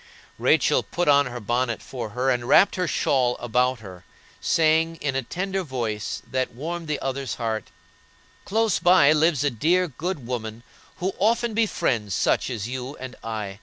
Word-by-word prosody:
Rachel -, -, +3 dB
put 175 Hz, -1 st, -3 dB
on 145 Hz, -2 st, +5 dB
her 125 Hz, 0 st, -6 dB
bonnet 120 Hz, +1 st, -1 dB
for 120 Hz, -4 st, -6 dB
her 130 Hz, +1 st, +2 dB
and 120 Hz, -1 st, -1 dB
wrapped 195 Hz, -, +6 dB
her 180 Hz, -1 st, -1 dB
shawl 125 Hz, -5 st, +1 dB
about 125 Hz, +1 st, 0 dB
her, 90 Hz, -4 st, -11 dB, 0.4 s
saying, 160 Hz, 0 st, +2 dB
in 145 Hz, -4 st, -3 dB
a 135 Hz, -, +1 dB
tender 190 Hz, +9 st, -3 dB
voice, 115 Hz, -, -4 dB
that 130 Hz, -2 st, -2 dB
warmed 165 Hz, +5 st, -5 dB
the 150 Hz, -1 st, -2 dB
other's 135 Hz, -1 st, -3 dB
heart: 110 Hz, -2 st, -2 dB, 0.8 s
"Close 225 Hz, -1 st, +1 dB
by 175 Hz, -5 st, +6 dB
lives 155 Hz, -2 st, +3 dB
a 145 Hz, -, +1 dB
dear, 175 Hz, +10 st, +2 dB
good 160 Hz, -1 st, -5 dB
woman 115 Hz, -2 st, -5 dB, 0.3 s
who 190 Hz, +2 st, -2 dB
often 230 Hz, +3 st, +2 dB
befriends 120 Hz, -, 0 dB
such -, -, +1 dB
as 115 Hz, -4 st, -4 dB
you 130 Hz, +2 st, -5 dB
and 130 Hz, -1 st, -8 dB
I. 105 Hz, -3 st, -5 dB
130 Hz, 165 wpm, -24 LUFS, 120-165 Hz, 0.8 s, wrapped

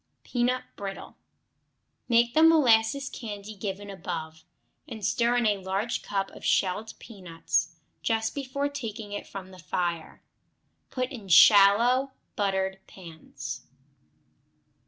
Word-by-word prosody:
Peanut 250 Hz, +1 st, 0 dB
Brittle 195 Hz, -1 st, -7 dB, 0.9 s
Make 235 Hz, 0 st, +3 dB
the 315 Hz, -, +4 dB
molasses 275 Hz, -5 st, +4 dB
candy 210 Hz, -4 st, -7 dB
given 200 Hz, +1 st, -5 dB
above, 160 Hz, -4 st, -6 dB, 0.4 s
and 215 Hz, -3 st, -6 dB
stir 240 Hz, +3 st, +2 dB
in 240 Hz, -, +1 dB
a 205 Hz, -2 st, +2 dB
large 195 Hz, +5 st, -2 dB
cup 195 Hz, -1 st, -3 dB
of -, -, -13 dB
shelled 205 Hz, +4 st, 0 dB
peanuts 180 Hz, -7 st, -3 dB, 0.3 s
just 225 Hz, -1 st, 0 dB
before 280 Hz, 0 st, -2 dB
taking 225 Hz, -7 st, -6 dB
it 205 Hz, -, -6 dB
from 190 Hz, -1 st, -9 dB
the 185 Hz, -, -13 dB
fire. 170 Hz, -1 st, -3 dB, 0.7 s
Put 255 Hz, 0 st, -3 dB
in 225 Hz, -7 st, -9 dB
shallow, 225 Hz, -, +6 dB, 0.2 s
buttered 190 Hz, -2 st, -1 dB
pans. 140 Hz, -8 st, -9 dB
205 Hz, 115 wpm, -27 LUFS, 190-240 Hz, 0.9 s, shallow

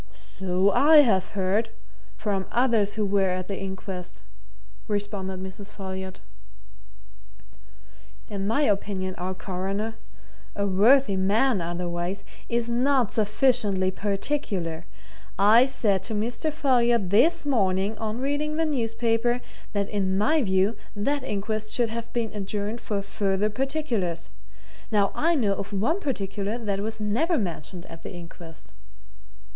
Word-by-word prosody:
"So 190 Hz, +1 st, +2 dB
I 300 Hz, +7 st, +7 dB
have 200 Hz, -4 st, +1 dB
heard 200 Hz, +4 st, +1 dB, 0.5 s
from 195 Hz, -3 st, -2 dB
others 230 Hz, -5 st, +2 dB
who 215 Hz, -1 st, 0 dB
were 195 Hz, -1 st, +2 dB
at 185 Hz, 0 st, -2 dB
the 195 Hz, -, -4 dB
inquest," 190 Hz, -, -6 dB, 0.6 s
responded 200 Hz, -2 st, -3 dB
Mrs. 195 Hz, +2 st, -8 dB
Folliot. 190 Hz, -1 st, -6 dB, 2.1 s
"In 200 Hz, -1 st, -3 dB
my 230 Hz, +8 st, +2 dB
opinion 195 Hz, -4 st, 0 dB
our 185 Hz, +1 st, -3 dB
Coroner 195 Hz, +4 st, -3 dB, 0.6 s
a 200 Hz, -, 0 dB
worthy 205 Hz, +4 st, +4 dB
man 205 Hz, +4 st, +2 dB
otherwise 175 Hz, +3 st, -3 dB, 0.2 s
is 235 Hz, 0 st, 0 dB
not 250 Hz, 0 st, +2 dB
sufficiently 210 Hz, -4 st, +2 dB
particular. 195 Hz, -, -2 dB, 0.5 s
I 220 Hz, +6 st, +6 dB
said 210 Hz, -8 st, +1 dB
to 215 Hz, +3 st, -1 dB
Mr. 230 Hz, +8 st, -1 dB
Folliot 240 Hz, -, +2 dB
this 310 Hz, +11 st, +4 dB
morning, 200 Hz, -5 st, +1 dB
on 220 Hz, 0 st, -3 dB
reading 290 Hz, +2 st, -1 dB
the 325 Hz, -, +2 dB
newspaper, 235 Hz, -3 st, +1 dB, 0.3 s
that 200 Hz, -1 st, 0 dB
in 190 Hz, -2 st, 0 dB
my 305 Hz, +10 st, +3 dB
view 190 Hz, 0 st, +2 dB, 0.2 s
that 275 Hz, +8 st, 0 dB
inquest 215 Hz, +1 st, -3 dB
should 240 Hz, -2 st, +2 dB
have 230 Hz, 0 st, -5 dB
been 230 Hz, -2 st, -2 dB
adjourned 210 Hz, +2 st, -3 dB
for 200 Hz, -2 st, -2 dB
further 200 Hz, +1 st, 0 dB
particulars. 240 Hz, -, -1 dB, 0.6 s
Now 205 Hz, -2 st, +3 dB
I 335 Hz, +2 st, +2 dB
know 215 Hz, -9 st, +2 dB
of 200 Hz, +1 st, -5 dB
one 235 Hz, -, +1 dB
particular 205 Hz, -, -2 dB
that 205 Hz, -4 st, -2 dB
was 220 Hz, +2 st, -3 dB
never 245 Hz, -, +1 dB
mentioned 175 Hz, -, -4 dB
at 165 Hz, -, -11 dB
the -, -, -7 dB
inquest!" 170 Hz, -2 st, -11 dB
205 Hz, 130 wpm, -26 LUFS, 190-235 Hz, 2.1 s, I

